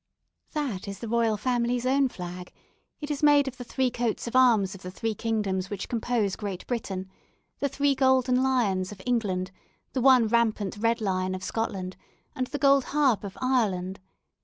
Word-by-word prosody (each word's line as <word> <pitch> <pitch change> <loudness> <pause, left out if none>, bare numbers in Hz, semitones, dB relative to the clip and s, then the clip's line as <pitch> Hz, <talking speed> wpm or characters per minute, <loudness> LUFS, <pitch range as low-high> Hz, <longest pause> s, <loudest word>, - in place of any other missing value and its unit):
"That 275 - -3
is 200 0 -5
the 230 - -7
Royal 225 -1 +1
Family's 245 0 0
own 270 +1 +3
flag. 180 -3 -8 0.5
It 295 0 -4
is 290 - -3
made 290 -2 +5
of 260 -1 -5
the 245 - -6
three 255 +1 0
coat 235 -2 -2
of 235 +1 -5
arms 225 -7 +4
of 195 - -11
the 180 - -6
three 225 +4 -3
kingdoms 205 -4 -1
which 205 -1 -5
compose 230 -4 0
Great 195 -3 -5
Britain, 195 -6 -3 0.5
the 280 - 0
three 285 +1 +2
golden 260 -1 +3
lions 210 -8 +1
of 205 - -10
England, 195 -7 0 0.4
the 260 - 0
one 255 -3 +6
rampant 220 -4 +1
red 230 +2 +1
lion 185 -2 -1
of 185 - -7
Scotland, 190 -3 -3 0.4
and 255 -1 -2
the 290 - -4
gold 275 -1 +4
harp 275 -8 +2
of 195 -2 -7
Ireland. 195 -8 0
230 Hz, 180 wpm, -27 LUFS, 195-255 Hz, 0.5 s, one